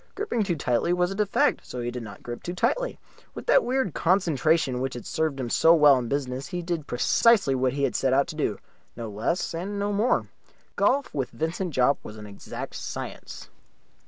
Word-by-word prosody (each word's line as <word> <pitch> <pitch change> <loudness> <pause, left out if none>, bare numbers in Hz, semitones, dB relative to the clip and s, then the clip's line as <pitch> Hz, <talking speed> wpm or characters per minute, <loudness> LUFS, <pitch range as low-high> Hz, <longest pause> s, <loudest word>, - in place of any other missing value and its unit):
Gripping 400 - -1
too 190 -4 0
tightly 125 +3 +1
was 180 +1 +1
a - - -4
defect, 210 -1 +1
so 125 - -7
he 120 0 -2
did 125 0 -5
not 100 -3 -10
grip 120 0 -6
too 175 - -5
tightly. - - 0 0.4
With - - -7
that - - +5
weird 255 - 0
concentration 160 -7 +2
which 130 -1 -2
had 120 - -7
served 155 -3 -1
him 120 -3 -3
so 165 +1 +6
well 150 -3 +7
in 120 - -4
business 135 0 -3
he 180 -2 -4
did 170 -3 -3
precisely 200 - +3
what 130 0 +1
he 140 0 -2
had - - 0
set 135 - +1
out 135 +1 +4
to 160 - -6
do 110 -10 -1 0.4
no 115 -1 -5
less 115 - -1
and 190 +5 -4
no 205 +1 -1
more. 215 +5 +1 0.5
Golf 275 +1 +1
with 135 -4 -2
Vincent 165 +5 -3
Jopp 130 +2 +3
was 105 - -9
an 105 - -9
exact 100 -1 -8
science. - - -7
155 Hz, 205 wpm, -26 LUFS, 125-185 Hz, 0.5 s, well